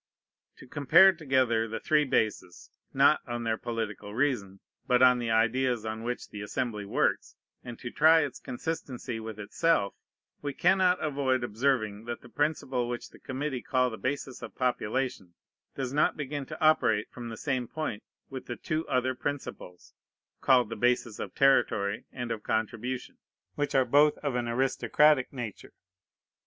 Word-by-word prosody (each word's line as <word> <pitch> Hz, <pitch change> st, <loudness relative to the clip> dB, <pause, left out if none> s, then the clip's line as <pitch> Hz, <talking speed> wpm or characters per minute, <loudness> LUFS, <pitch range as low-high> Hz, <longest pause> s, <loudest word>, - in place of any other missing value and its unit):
To -, -, -13 dB
compare 160 Hz, +8 st, +6 dB
together 130 Hz, -8 st, +1 dB
the 115 Hz, 0 st, -4 dB
three 150 Hz, -1 st, +2 dB
bases, 110 Hz, -8 st, -2 dB, 0.2 s
not -, -, +4 dB
on 120 Hz, 0 st, -4 dB
their 115 Hz, -1 st, 0 dB
political 110 Hz, -3 st, -5 dB
reason, 115 Hz, -8 st, -1 dB, 0.3 s
but 125 Hz, -1 st, +4 dB
on 125 Hz, -1 st, +6 dB
the 120 Hz, -1 st, -2 dB
ideas 115 Hz, +1 st, +1 dB
on 110 Hz, 0 st, -4 dB
which 125 Hz, +2 st, -4 dB
the 105 Hz, -, -8 dB
Assembly 105 Hz, 0 st, -3 dB
works, -, -, 0 dB, 0.3 s
and 120 Hz, -1 st, -8 dB
to 120 Hz, -, -7 dB
try 160 Hz, +1 st, +5 dB
its 145 Hz, -3 st, -4 dB
consistency 125 Hz, -4 st, -5 dB
with 110 Hz, -1 st, -7 dB
itself, 105 Hz, +2 st, +1 dB, 0.5 s
we 145 Hz, -1 st, -4 dB
cannot 185 Hz, 0 st, +3 dB
avoid 135 Hz, -4 st, 0 dB
observing 110 Hz, -3 st, -1 dB
that 120 Hz, 0 st, -5 dB
the 120 Hz, -, -14 dB
principle 135 Hz, -4 st, -1 dB
which 120 Hz, 0 st, -5 dB
the -, -, -16 dB
committee 135 Hz, -1 st, -4 dB
call 125 Hz, 0 st, +1 dB
the 110 Hz, -, -6 dB
basis 135 Hz, -1 st, -3 dB
of -, -, -9 dB
population 125 Hz, -6 st, -2 dB, 0.4 s
does 135 Hz, -1 st, -3 dB
not 150 Hz, -, +2 dB
begin 145 Hz, -2 st, -4 dB
to -, -, -8 dB
operate 155 Hz, -9 st, +3 dB
from 120 Hz, -2 st, -7 dB
the 115 Hz, -, -7 dB
same 130 Hz, -2 st, -2 dB
point 155 Hz, -7 st, -4 dB, 0.3 s
with 130 Hz, -1 st, -8 dB
the 120 Hz, -, -4 dB
two 155 Hz, +3 st, -3 dB
other 130 Hz, 0 st, +1 dB
principles, 130 Hz, -9 st, -6 dB, 0.5 s
called 125 Hz, -4 st, +4 dB
the 115 Hz, -, -4 dB
bases 120 Hz, -1 st, 0 dB
of -, -, -6 dB
territory 110 Hz, -6 st, +2 dB
and 120 Hz, -2 st, -5 dB
of 110 Hz, -2 st, -3 dB
contribution, 115 Hz, +4 st, -3 dB, 0.3 s
which 145 Hz, -1 st, -2 dB
are 130 Hz, -1 st, +4 dB
both 145 Hz, +4 st, +4 dB
of 145 Hz, -3 st, -1 dB
an 120 Hz, -1 st, -1 dB
aristocratic 130 Hz, +3 st, +2 dB
nature. 120 Hz, -6 st, -7 dB
125 Hz, 160 wpm, -29 LUFS, 115-140 Hz, 0.5 s, compare